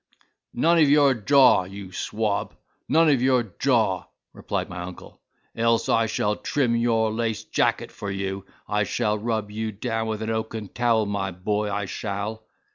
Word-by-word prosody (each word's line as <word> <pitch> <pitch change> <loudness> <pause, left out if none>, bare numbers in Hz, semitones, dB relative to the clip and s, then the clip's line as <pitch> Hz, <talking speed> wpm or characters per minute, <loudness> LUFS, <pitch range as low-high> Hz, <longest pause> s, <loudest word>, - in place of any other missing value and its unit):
"None 165 +7 +3
of 150 -3 +5
your 145 -2 +5
jaw, 130 -3 +5
you 95 0 -9
swab—none 110 - -1
of 140 -5 +3
your 130 -1 +3 0.2
jaw," 110 -9 +2 0.3
replied - - -3
my 90 0 -7
uncle, 90 0 -10 0.3
"else 115 0 +1
I 115 0 +3
shall 105 -1 -1
trim 125 -5 0
your 115 -2 +2
laced 115 -1 -3
jacket - - +1
for 100 - -6
you. 95 0 -3 0.2
I 105 0 +1
shall 105 0 -1
rub 110 -2 -2
you 110 +1 -3
down 115 +2 -3
with 110 0 -3
an 110 - -2
oaken 110 -2 -4
towel, 115 -1 +1
my 100 -1 -2
boy, 105 +3 -2
I 100 0 -2
shall." 105 +3 -5
110 Hz, 160 wpm, -24 LUFS, 100-120 Hz, 0.3 s, of